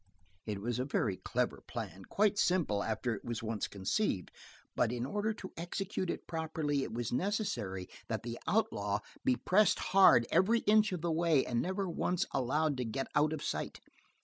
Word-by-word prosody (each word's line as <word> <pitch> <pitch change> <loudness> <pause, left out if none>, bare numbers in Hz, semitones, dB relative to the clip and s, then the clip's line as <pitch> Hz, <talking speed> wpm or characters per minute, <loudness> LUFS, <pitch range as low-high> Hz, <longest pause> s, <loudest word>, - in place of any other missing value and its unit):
It 105 -2 -2
was 120 +3 -2
a - - +1
very 105 -8 0
clever - - -1
plan, 95 0 -6
quite 205 0 +2
simple 165 - +2
after 115 +2 -1
it 105 - -7
was 120 -1 -4
once 110 -2 -2
conceived, 100 - -1 0.4
but - - +2
in 120 0 -2
order 210 +9 -1
to 190 - -9
execute 185 +2 -3
it - - -3
properly 155 -3 -1
it 135 - -4
was 115 0 -3
necessary 120 - -1 0.2
that 110 0 -3
the 120 0 -5
outlaw 105 - +1 0.2
be 125 - +3
pressed 205 - +3 0.2
hard 190 -11 +7
every 230 +5 +4
inch 215 0 +4
of 180 -3 -3
the 170 0 0
way 160 -3 +3
and 120 -1 0
never 190 +2 -1
once 180 +1 0
allowed 140 +3 +1
to 125 - -1
get 125 +4 -3
out 150 +1 +3
of 155 -2 -4
sight. - - -3
145 Hz, 180 wpm, -33 LUFS, 115-185 Hz, 0.4 s, hard